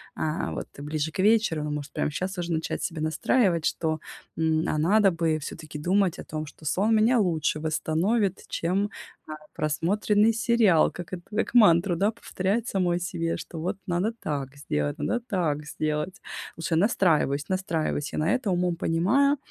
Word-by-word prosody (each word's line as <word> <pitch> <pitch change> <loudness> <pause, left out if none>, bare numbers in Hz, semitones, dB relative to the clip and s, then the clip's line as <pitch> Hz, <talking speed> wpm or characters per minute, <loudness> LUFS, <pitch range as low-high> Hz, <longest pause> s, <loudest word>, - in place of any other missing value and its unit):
а, 155 +1 -2
вот - - -5
ближе 150 +2 -2
к - - -9
вечеру. 210 -8 +3
Ну, 150 - -3
может, 150 -1 -5
прям - - -1
щас 185 +5 -3
уже 175 -1 -2
начать 160 0 -2
себе 165 -2 -3
настраивать, 165 - +1
что, 160 -2 0 0.4
м, 160 -1 +1
а - - 0
надо 195 +6 +4
бы 165 -2 0
всё-таки 155 0 -7
думать 185 +3 +2
о - - -6
том, 155 0 -5
что 155 - -15
сон 205 +9 +2
меня 230 +3 +4
лучше 160 -6 +1
восстановит, 175 +6 0
чем, 185 +4 0 0.4
э, - - -7 0.2
просмотренный 205 +8 +2
сериал. 225 -7 +3
Как 175 -3 -8
это, 175 -1 -5
как 220 - -1
мантру, 175 -5 +6
да, 200 +5 +2
повторять 220 0 -2
самой 180 -3 +1
себе, 165 -1 -2
что 165 - -8
вот 180 +5 -2
надо 180 +6 0
так 140 -2 -4
сделать, 75 - -2
надо 240 - 0
так 170 - -2
сделать. 155 +6 -3 0.4
Лучше 165 0 -1
настраиваюсь, 160 -7 +2
настраиваюсь 165 -6 -1
я - - -1
на 155 +2 +1
это, 255 -5 -1
умом 180 -1 +1
понимаю, 220 - +2
170 Hz, 170 wpm, -26 LUFS, 155-200 Hz, 0.4 s, мантру